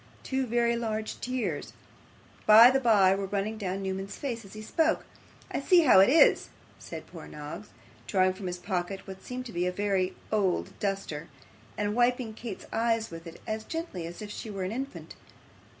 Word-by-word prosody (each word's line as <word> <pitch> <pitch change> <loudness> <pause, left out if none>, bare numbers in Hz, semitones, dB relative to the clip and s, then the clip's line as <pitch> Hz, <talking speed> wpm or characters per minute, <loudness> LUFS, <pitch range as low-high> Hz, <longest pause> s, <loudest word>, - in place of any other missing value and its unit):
Two 265 -1 -1
very 235 0 +2
large 220 -2 -3
tears, 205 - -3 0.7
by 225 +3 +10
the 270 - +2
bye, 205 -7 +5
were 195 0 -2
running 205 +2 -2
down 195 -2 -3
Newman's 190 +1 -4
face 240 -5 -4
as 195 - -13
he 215 - -8
spoke. 320 +8 +1 0.5
'I - - -1
see 345 +5 +5
how 255 - +7
it 195 - +7
is,' 315 +5 +5 0.3
said - - -8
poor - - -11
Noggs, 150 +8 -8 0.4
drawing 185 -2 +3
from 185 0 -7
his 180 0 -3
pocket 180 +1 -3
what 190 0 -8
seemed 250 +3 -6
to 230 - -8
be 175 +1 0
a - - 0
very 190 -1 0 0.2
old 200 -4 +1
duster, 195 -6 -3 0.5
and 205 0 0
wiping 245 -1 +1
Kate's 225 -3 -7
eyes 225 -2 +1
with 165 +1 -9
it, 165 - -10
as 220 0 -3
gently 320 - -5
as 175 +5 -8
if 205 - -7
she 220 - -6
were 195 -2 -4
an 185 - -2
infant. 270 +4 -6
210 Hz, 185 wpm, -29 LUFS, 190-235 Hz, 0.7 s, by